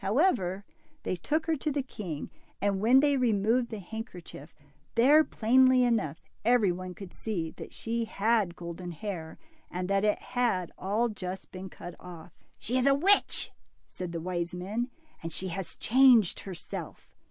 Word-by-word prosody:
However, 200 - +1 0.4
they - - -1
took 305 - -1
her 325 - +1
to 300 +2 -2
the 280 -1 -1
king, 180 - -6 0.3
and 200 -1 0
when 250 +5 +6
they 285 -1 +3
removed 235 0 +2
the 220 - -5
handkerchief, 180 - -8 0.4
there, 285 +7 +6
plainly 255 +1 +4
enough, 210 -11 +1 0.2
every 225 -4 +4
one 180 0 -6
could 190 0 -10
see 170 -8 -3
that - - -8
she 230 0 -2
had 220 - -15 0.3
had 170 - -12
golden 170 +1 -7
hair, 165 -2 -6 0.3
and 180 0 -3
that 195 0 +2
it 210 0 +3
had 240 -8 -1
all 210 +5 0
just 190 -3 -6
been 190 +1 -7
cut 175 0 -9
off. 175 -1 -11 0.3
She 250 +3 0
is 255 - +2
a 275 - +6
witch," 390 +8 +4 0.3
said 180 -2 -7
the 170 - -3
wise 175 0 -3
men, 210 +7 -3 0.3
and 165 - -5
has 185 +2 -4
changed 245 -5 +5
herself." 185 -3 -8
205 Hz, 165 wpm, -29 LUFS, 180-245 Hz, 0.4 s, when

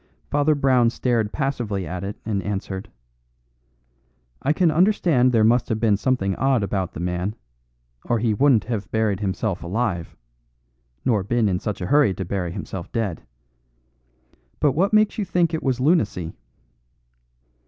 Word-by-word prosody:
Father 145 +1 +3
Brown 130 -4 +3
stared 115 -3 0
passively 120 -9 -2
at 90 +3 -5
it 100 +1 -5
and 105 -3 -1
answered: 95 -1 -4 1.5
"I 145 - +1
can 165 +1 +3
understand 165 -7 +3
there 115 -3 +3
must 120 +2 +3
have 110 - -1
been 110 -3 +3
something 100 -4 0
odd 130 -4 +2
about 95 -3 -2
the - - -7
man, 90 +4 -2 0.7
or 120 - +1
he 115 -1 +1
wouldn't 130 0 +4
have 110 -4 -4
buried 110 -3 0
himself 100 -1 -2
alive 90 -2 -2 0.9
nor 115 -6 +2
been 115 +2 +1
in 90 -2 0
such 105 -1 -4
a - - -2
hurry 140 -3 +3
to 95 - -4
bury 90 -1 -3
himself 95 -2 -7
dead. 105 -8 -2 1.4
But 145 - +3
what 175 +9 +1
makes 215 0 +3
you - - +1
think 175 -3 +1
it 160 - -1
was 130 -2 0
lunacy?" 120 - +1
110 Hz, 155 wpm, -23 LUFS, 95-135 Hz, 1.5 s, wouldn't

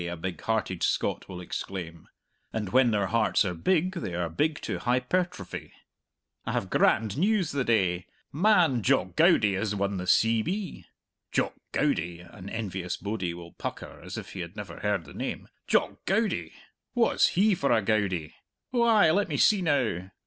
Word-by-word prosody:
a 85 - -5
big 85 -1 -5
hearted 110 -6 -1
Scot - - 0
will 90 - -7
exclaim 85 -2 -6 0.4
(and 105 -3 -3
when 130 +2 +4
their 105 -3 +1
hearts 110 0 +2
are 90 - -1
big 180 - +1
they 130 - -4
are 85 -1 -1
big 150 - 0
to - - -3
hypertrophy) 130 +9 -1 0.7
"I - - -3
have - - -2
grand 110 +4 +2
news 195 -2 +2
the 140 -2 0
day! 95 -7 +1 0.3
Man, 165 - +4
Jock - - +1
Goudie 105 -2 +5
has 105 +2 -1
won 100 0 -1
the 90 0 -5
C.B." 115 - +1 0.5
"Jock - - 0 0.2
Goudie" 85 +1 0
an 90 +2 -11
envious 95 -5 -4
bodie 100 -5 -3
will 85 -1 -10
pucker - - -7
as - - -7
if - - -8
he 95 - -7
had 85 +2 -6
never 100 -5 -7
heard 100 -5 -1
the 70 - -12
name - - -5 0.2
"Jock - - +1
Goudie? 215 +3 0 0.4
Wha's 240 -1 +3
he 205 +2 +5
for 140 -7 0
a 115 -3 +3
Goudie? 95 -7 0 0.4
Oh 240 - +2
ay, 220 -8 +5
let 200 +5 +1
me - - -1
see 210 -3 +4
now. 120 - 0
110 Hz, 170 wpm, -28 LUFS, -, 0.7 s, Goudie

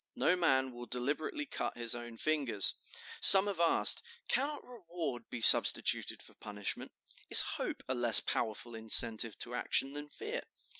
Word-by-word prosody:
No 180 - -1
man 135 -7 -2
will 120 0 -12
deliberately 145 - -6
cut 275 - -7
his 120 -1 -2
own 120 -1 -10
fingers. 135 -10 -2 0.5
Some 195 0 +9
have 200 -4 -6
asked, 170 -1 +1 0.3
'Cannot 285 +3 -4
reward 170 - -9
be 120 - -9
substituted - - +4
for - - -15
punishment? 105 -1 -8 0.4
Is - - +8
hope - - -7
a 130 - -3
less 120 -3 +4
powerful 115 +1 -6
incentive 110 0 +3
to 120 - -8
action 135 +2 -4
than 145 0 -10
fear? 435 - -8
130 Hz, 150 wpm, -30 LUFS, 115-170 Hz, 0.5 s, Some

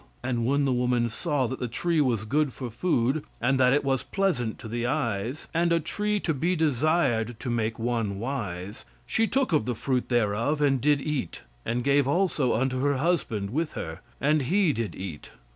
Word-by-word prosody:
And 120 -2 0
when 140 +1 +2
the 135 - +2
woman 125 -1 +1
saw 145 0 0
that 130 +2 -4
the 125 - -2
tree 165 +7 0
was 120 -6 +1
good 145 +3 +1
for 125 -3 -6
food, 135 0 +1 0.2
and 130 +3 +2
that 125 -1 +5
it 145 +2 +3
was 135 -2 +1
pleasant 150 - -1
to 115 - -9
the 120 +2 -2
eyes, 120 -2 -2
and 170 +1 +2
a 170 - +4
tree 210 +6 -1
to 160 - 0
be 170 +6 0
desired 140 -7 +1
to 125 - -3
make 115 -1 -1
one 115 -4 -1
wise, 105 -5 -4 0.2
she 225 0 +1
took 265 -7 0
of 150 -8 +3
the 125 -1 -1
fruit 125 +2 -1
thereof 120 +5 +1
and 135 -3 +2
did 145 0 +3
eat, 140 - -3 0.2
and 120 +2 0
gave 140 0 +3
also 150 -5 +2
unto 130 +2 0
her 140 0 +2
husband 130 - 0
with 155 +5 -1
her, 80 0 -5 0.2
and 150 +1 +3
he 185 -4 +3
did 110 - -3
eat...... 90 -6 -7
130 Hz, 195 wpm, -27 LUFS, 115-150 Hz, 0.2 s, that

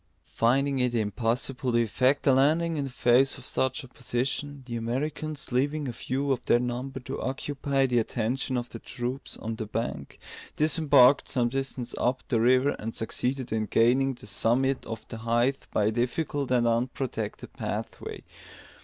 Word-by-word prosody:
Finding 135 +4 +2
it 125 -1 +1
impossible 120 +4 -1
to - - +4
effect 130 +5 +1
a 135 - +6
landing 160 +5 +3
in 145 -2 -1
the - - -5
face 125 +2 +3
of - - -12
such 130 +3 -1
opposition, 130 +3 -3
the 120 -2 -5
Americans, 140 +6 -3
leaving 145 +4 0
a 120 - -3
few 135 +4 -2
of 130 -2 0
their - - +6
number 125 +2 -3
to 130 +2 -6
occupy 135 0 -1
the 125 -2 +2
attention 120 +3 -1
of 120 0 -3
the 115 - -8
troops 125 +3 -5
on 110 0 -5
the 110 - -4
bank, 105 -10 -4 0.4
disembarked 145 -3 +5
some 120 -2 +1
distance 135 -2 -4
up 125 +1 0
the 115 -4 +2
river, 130 +4 +4
and 115 +1 -5
succeeded 125 +3 -2
in 110 -1 0
gaining 130 +3 +3
the - - -14
summit 125 +6 +1
of 115 -1 -6
the 115 - -6
height 120 +4 0
by 105 - +2
a 110 - +3
difficult 135 +4 -1
and 125 -2 +3
unprotected 115 -2 -2
pathway. - - -5
125 Hz, 165 wpm, -27 LUFS, 120-135 Hz, 0.4 s, a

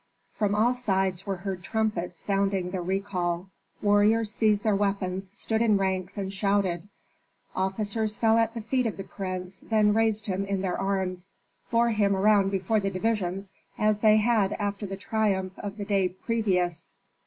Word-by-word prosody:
From 205 -1 0
all 230 +4 +3
sides 190 -6 -1
were 195 - 0
heard 185 0 -5
trumpets 195 -4 -2
sounding 195 -2 0
the 185 -1 -2
recall. 185 -1 -2 0.3
Warriors 210 +1 +3
seized 215 -2 +2
their 215 -2 +3
weapons, 195 -1 -1
stood 220 0 -1
in 215 -3 +4
ranks 190 0 -1
and 195 -1 -3
shouted. 195 -2 0 0.7
Officers 210 +3 -1
fell 225 0 +4
at 225 0 +1
the 230 - -3
feet 250 +2 0
of 220 - -4
the 195 - -5
prince, 185 0 -6
then 215 -2 +2
raised 220 -1 +1
him 195 -1 -1
in 195 -1 -2
their 185 -2 -1
arms, 190 -1 -2 0.4
bore 235 0 +3
him 205 -2 +2
around 200 0 +4
before 195 +3 +1
the 195 -1 -1
divisions, 195 -1 -2 0.2
as 215 -1 +2
they 215 0 +5
had 215 -3 +2
after 205 0 -3
the 195 0 -5
triumph 195 -3 0
of 205 0 -6
the 205 - -4
day 195 -3 +2
previous. 180 -4 -1
200 Hz, 165 wpm, -27 LUFS, 190-215 Hz, 0.7 s, they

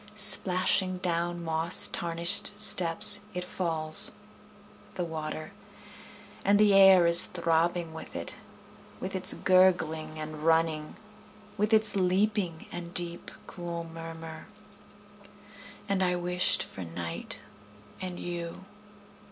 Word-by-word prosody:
Splashing 185 -2 +1
down 175 -1 -3
moss 165 +1 +3
tarnished 170 +3 +1
steps 205 0 +6 0.2
It 180 - -3
falls, 165 -3 +2 0.8
the 180 - -3
water; 155 -1 -7 0.9
And 200 +1 +2
the 210 -1 +4
air 195 -2 +6
is 170 +1 +6
throbbing 170 -1 -2
with 160 - -11
it. - - -5 0.7
With 185 - -7
its 185 - +3
gurgling 160 -4 +1
and 155 0 -8
running. 160 -1 0 0.6
With 210 +2 -2
its 220 -1 +5
leaping, 190 -2 -1
and 175 0 -8
deep, 175 -1 -3 0.2
cool 170 -1 -7
murmur. 165 -1 -10 1.4
And 200 -2 -2
I 180 -1 0
wished 180 +1 0
for 95 - -10
night 85 0 -7 0.6
and 180 -1 -7
you. 175 +1 -7
175 Hz, 110 wpm, -27 LUFS, 165-185 Hz, 1.4 s, steps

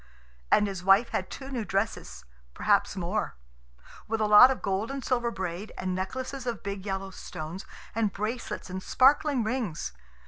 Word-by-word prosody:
And 210 - +5
his 195 -3 -4
wife 195 +5 +5
had - - -2
two 270 0 -8
new 245 -4 -2
dresses, 205 +2 -3 0.3
perhaps - - +2
more; - - -2 0.7
with 225 0 -1
a 215 - +2
lot 210 +4 +9
of 265 - -2
gold 195 +3 -1
and 275 -2 -5
silver 240 -2 +1
braid, 190 -1 -5
and 185 0 -2
necklaces 255 +7 -4
of 235 -3 -3
big 200 0 -5
yellow 195 0 -3
stones, 165 0 -7 0.3
and 220 -2 +1
bracelets 215 +5 -4
and 190 +1 -4
sparkling 270 +2 +3
rings. 220 - -2
210 Hz, 165 wpm, -28 LUFS, 190-250 Hz, 0.7 s, lot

